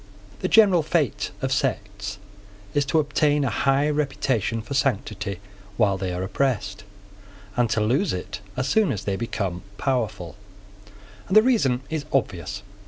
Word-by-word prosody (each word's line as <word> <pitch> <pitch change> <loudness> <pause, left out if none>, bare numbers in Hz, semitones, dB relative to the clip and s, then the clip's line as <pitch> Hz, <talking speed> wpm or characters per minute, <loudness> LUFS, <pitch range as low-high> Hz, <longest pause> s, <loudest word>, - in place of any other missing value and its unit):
The 185 - -1
general 195 -5 +6
fate 155 -4 0
of 135 0 +1
sects 105 -6 -2 0.6
is 145 -1 +2
to 135 +3 +1
obtain 150 -1 +2
a 125 - 0
high 135 +6 +2
reputation 135 -7 0
for 120 - -6
sanctity 105 -7 -1 0.4
while 105 -4 +3
they 95 -1 -3
are 90 +1 -3
oppressed, 105 -2 -1 0.7
and 120 -2 +2
to 110 0 +1
lose 130 - +2
it 100 +4 -5 0.2
as 130 +1 0
soon 215 +6 +3
as 100 - -3
they 100 - -1
become 95 -5 -3 0.2
powerful: 105 - -2 0.9
and 190 - +4
the 215 - +8
reason 140 - +2
is 155 -2 -2
obvious. 100 -6 -1
125 Hz, 150 wpm, -24 LUFS, 100-145 Hz, 0.9 s, the